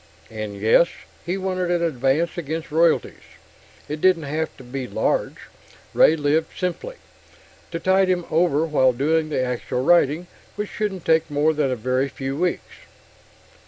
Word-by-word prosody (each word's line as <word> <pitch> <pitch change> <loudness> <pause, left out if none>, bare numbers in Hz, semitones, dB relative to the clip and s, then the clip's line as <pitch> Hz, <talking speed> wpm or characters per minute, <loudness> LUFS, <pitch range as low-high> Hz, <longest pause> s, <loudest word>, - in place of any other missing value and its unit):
And 105 -2 -6
yes, 110 +11 +5 0.4
he 180 +2 -1
wanted 185 -2 -2
an 175 -1 +1
advance 150 +2 0
against 160 -1 -5
royalties 165 +1 +2 0.7
it 150 +1 -5
didn't 185 -3 +3
have 155 +3 -2
to 130 - -12
be 130 +1 -5
large; - - -1 0.6
Ray 160 - +5
lived 155 +1 0
simply 185 - -3 0.7
to 165 - -4
tide 190 +2 +3
him 180 -2 0
over 160 -2 +2
while 130 -5 +3
doing 155 +5 0
the 140 -4 0
actual 125 0 -3
writing, 170 +1 +3 0.3
which 210 0 -4
shouldn't 195 -5 -3
take 160 0 +2
more 150 +2 +2
than 150 -3 0
a 130 - 0
very 130 +4 -1
few 135 0 -5
weeks. 180 +3 -3
155 Hz, 155 wpm, -22 LUFS, 135-175 Hz, 0.7 s, yes